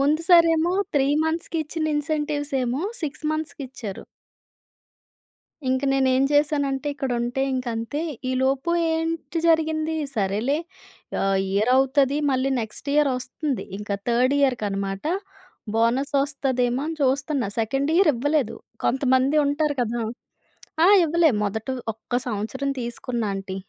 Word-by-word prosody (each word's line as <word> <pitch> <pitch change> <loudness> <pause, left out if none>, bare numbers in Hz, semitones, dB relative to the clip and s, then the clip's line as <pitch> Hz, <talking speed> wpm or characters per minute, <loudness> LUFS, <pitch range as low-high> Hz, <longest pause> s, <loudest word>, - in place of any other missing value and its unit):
ముందు 300 +4 +2
సారేమో 335 0 +5 0.2
3 275 0 +3 0.2
మంత్స్‌కి 325 0 -2
ఇచ్చిన 310 +1 -3
ఇన్సెంటివ్స్ 295 -1 -2
ఏమో 255 +7 -1 0.2
6 305 0 -5
మంత్స్‌కి 310 -2 -4
ఇచ్చారు. 215 -6 -7 1.7
ఇంక 260 +2 0
నేను 270 -1 +2
ఏం 265 - +3
చేశానంటే 290 -1 +1
ఇక్కడ 270 -2 -3
ఉంటే 245 +3 -2
ఇంక 255 -1 -2
అంతే. 230 +7 -3 0.3
ఈలోపు 265 +4 +1 0.2
ఏంటి 325 +1 -2
జరిగింది? 320 -1 +2 0.2
సరేలే 215 +8 0 0.6
ఆహ్, 195 0 +2
ఇయర్ 215 +5 +2
అవుతది 270 +1 +3
మళ్ళీ 260 +1 +1
నెక్స్ట్ 220 +5 -8
ఇయర్ 295 -1 +4
వస్తుంది. 265 +2 -3
ఇంక 210 0 -9 0.2
థర్డ్ 250 +3 +3
ఇయర్‌కి 255 -6 +2
అనమాట. 195 +1 -3 0.7
బోనస్ 235 +5 +1
వస్తదేమో 260 -3 -1
అని 325 - -3
చూస్తున్నా. 275 -2 +1
సెకండ్ 270 +6 0
ఇయర్ 370 -3 +5
ఇవ్వలేదు. 280 0 0 0.3
కొంతమంది 260 +2 +2
ఉంటారు 290 +1 +1
కదా! 235 0 -1 0.8
ఆ! - - +7 0.2
ఇవ్వలే 330 0 +4
మొదట 215 +3 -3 0.3
ఒక్క 225 +3 -12
సంవత్సరం 240 +6 -2
తీసుకున్న 240 0 -3
ఆంటీ. 195 -1 -5
270 Hz, 125 wpm, -24 LUFS, 240-300 Hz, 1.7 s, ఆ